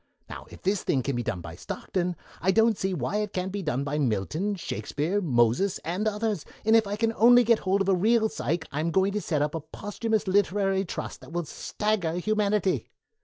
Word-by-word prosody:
Now, - - -9
if - - -14
this 195 +1 +1
thing 130 -3 0
can 135 0 -1
be 120 - 0
done 90 -6 -3
by 85 -1 -8
Stockton, 180 - -3 0.3
I 185 - +1
don't 225 +2 +4
see 190 0 -2
why 185 +4 -1
it 210 -1 -2
can't 185 +1 -2
be 200 +1 -3
done 140 -6 -1
by 145 +1 -2
Milton, 145 - 0
Shakespeare, 175 +1 -2
Moses, 125 - +2
and 180 +6 -1
others, 210 -4 -1 0.2
and 220 +1 +5
if 225 -2 +4
I 200 - -2
can 225 +1 0
only 245 +2 +6
get 230 -1 +4
hold 195 +1 +1
of 195 - 0
a - - +5
real 220 +4 +3
Psyche 170 -6 -2
I'm 155 +4 -1
going 190 +3 +2
to 210 - -1
get 150 -6 0
up 150 - -2
a 165 - -2
posthumous 205 +7 -3
literary 195 0 +2
trust - - -6
that - - -13
will 175 0 -2
stagger 210 -1 -2
humanity." 210 0 0
190 Hz, 215 wpm, -27 LUFS, 160-210 Hz, 0.3 s, only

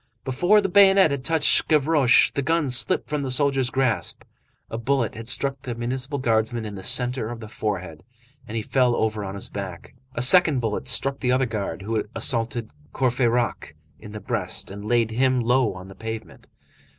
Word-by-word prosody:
Before 175 +11 +3
the 195 - -1
bayonet 195 -3 +5
had 140 -2 -3
touched 160 +2 +3
Gavroche, 150 -4 +3
the 140 - -2
gun 150 -1 0
slipped 125 - +2
from 150 -1 -2
the 135 - -4
soldier's 135 -1 +2
grasp, 125 -9 -1 0.4
a 115 - -6
bullet 125 -1 -1
had 115 +1 -9
struck 135 +1 0
the 120 -2 -6
municipal 130 +4 -4
guardsman 115 -2 0
in 105 - -6
the 95 - -8
centre 125 +2 +1
of 120 -1 -7
the 110 - -9
forehead, 95 -7 -5 0.5
and 110 - -5
he 110 - -2
fell 125 -1 +1
over 110 -1 -1
on 95 0 -6
his 100 - -4
back. 95 -3 -8 0.2
A 120 - +2
second 155 -1 +4
bullet 115 +2 -3
struck 135 +3 +2
the 125 - 0
other 130 +1 +2
guard, 100 -6 -5
who 110 +2 -2
had 105 - -3
assaulted 115 -2 0 0.2
Courfeyrac 120 - -1 0.2
in 105 - -11
the 105 - -7
breast, - - -4
and 100 +1 -8
laid 115 0 +1
him 130 +2 +1
low 125 -1 +1
on 95 0 -10
the 95 - -11
pavement. 110 +2 -8
120 Hz, 190 wpm, -23 LUFS, 110-135 Hz, 0.5 s, bayonet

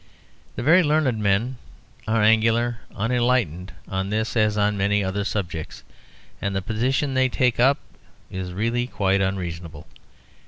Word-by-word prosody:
The - - -4
very 165 +7 +6
learned 150 -7 +1
men 105 +6 0 0.5
are 110 0 +2
angularly 115 +2 +3 0.2
unenlightened 115 -6 0 0.2
on 95 0 -2
this 110 +3 -1
as 105 -2 +2
on 105 0 +2
many 100 +1 +1
other 95 +2 -2
subjects; 90 -6 -4 0.6
and 100 -1 -2
the 95 - 0
position 130 +6 0
they 130 0 +2
take 125 -1 +1
up 135 +4 +5 0.5
is 95 -1 -5
really 115 +6 -1
quite 100 -4 +1
unreasonable. 85 -5 -4
110 Hz, 135 wpm, -23 LUFS, 95-120 Hz, 0.6 s, very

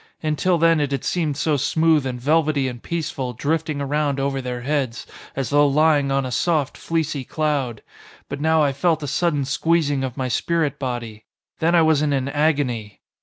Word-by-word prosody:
Until 155 +4 +1
then 165 0 +4
it 145 -2 0
had 140 - -2
seemed 155 -6 -1
so 155 -1 +1
smooth 155 0 +2
and 125 -1 -4
velvety 150 0 +2
and 120 -2 -6
peaceful 145 -7 -3
drifting 155 +3 -2
around 140 0 -1
over 135 0 -1
their 125 -1 -4
heads, 135 -3 -2 0.3
as 135 -1 -3
though 145 0 +5
lying 145 -1 +3
on 135 -1 +1
a 130 - -4
soft, 155 0 0
fleecy 155 -4 -2
cloud. 140 -6 -2 0.4
But 140 0 -6
now 160 0 +3
I 140 -2 +1
felt 160 +2 +1
a - - -3
sudden 150 0 0
squeezing 145 -1 +1
of 130 -1 -4
my 130 -1 -1
spirit 160 +5 0
body. 120 -5 -5 0.3
Then 170 +2 +2
I 165 - +5
was 160 -2 +3
in 150 -1 +1
an 135 0 -1
agony. 140 -8 -1
145 Hz, 185 wpm, -22 LUFS, 135-160 Hz, 0.4 s, though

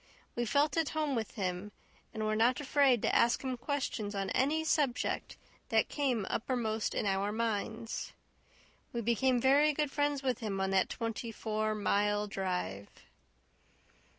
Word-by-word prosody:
We 240 - 0
felt 290 +6 +2
at 325 -3 +2
home 305 -3 +1
with 225 -4 -3
him, 185 0 -3 0.4
and 220 -1 -3
were 215 0 +1
not 235 +5 +3
afraid 275 -4 +3
to - - +2
ask 235 +3 +3
him 260 -1 -2
questions 240 -5 -3
on 195 -1 -2
any 295 +5 +2
subject 290 -5 0 0.3
that - - +2
came 255 -8 0
uppermost 225 -3 -1
in - - 0
our 195 +1 +1
minds. 225 0 -2 0.8
We 235 - -1
became 245 +3 +2
very 285 +4 +4
good 295 -1 -1
friends 290 -1 0
with 255 -3 0
him 205 -5 -3
on 190 0 0
that 190 -1 +2
twenty 230 0 -4
four 215 0 -1
mile 205 0 +1
drive. 180 - -3
230 Hz, 150 wpm, -32 LUFS, 210-265 Hz, 0.8 s, very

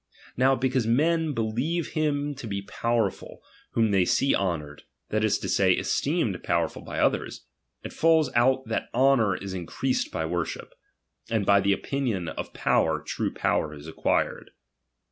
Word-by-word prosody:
Now 130 +2 +4
because 130 -2 0
men 155 +5 +2
believe 125 +10 -1
him 145 -2 -1
to 130 -4 -8
be 100 -1 -3
powerful, 115 0 -2 0.3
whom 110 -2 +2
they 95 -2 +4
see 135 +9 +2
honoured, 75 -6 -2 0.3
that 110 0 0
is 110 - +2
to - - -5
say, - - +3
esteemed - - 0
power - - +1
ful - - -11
by - - -7
others; - - 0 0.4
It - - -7
falls 160 -4 +3
out 130 +2 +3
that 110 - -2
honour 125 -6 +4
is 95 -1 -6
increased 95 +9 -2
by 80 - -2
worship; 85 0 -4 0.6
and 110 -3 0
by 100 0 +5
the 100 0 +3
opinion 115 -10 -2
of - - -6
power 80 -1 +1
true - - -3
power 75 -1 -1
is 75 0 -12
acquired. 80 - -1
115 Hz, 160 wpm, -26 LUFS, 95-135 Hz, 0.6 s, by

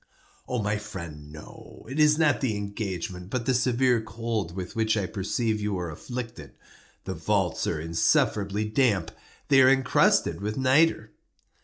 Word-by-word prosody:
"My 105 -4 -1
friend, 85 -8 -8
no. 75 0 -13
It 135 +5 -5
is 150 0 +5
not 150 -5 +2
the 115 -6 0
engagement, 95 -3 -5
but 120 +1 -2
the 130 - +2
severe 125 -1 +2
cold 110 -5 -4
with 95 +3 -6
which 110 -1 +1
I 100 - 0
perceive 110 +2 -2
you 105 -2 -1
are 90 -2 -4
afflicted. 120 - -7 0.5
The - - -4
vaults - - 0
are - - -1
insufferably 100 +5 +1
damp. 105 -6 +1 0.4
They 135 -2 +6
are 130 - +7
encrusted 135 -6 +3
with 105 +1 -3
nitre." 135 +5 +3
110 Hz, 150 wpm, -26 LUFS, 95-125 Hz, 0.5 s, are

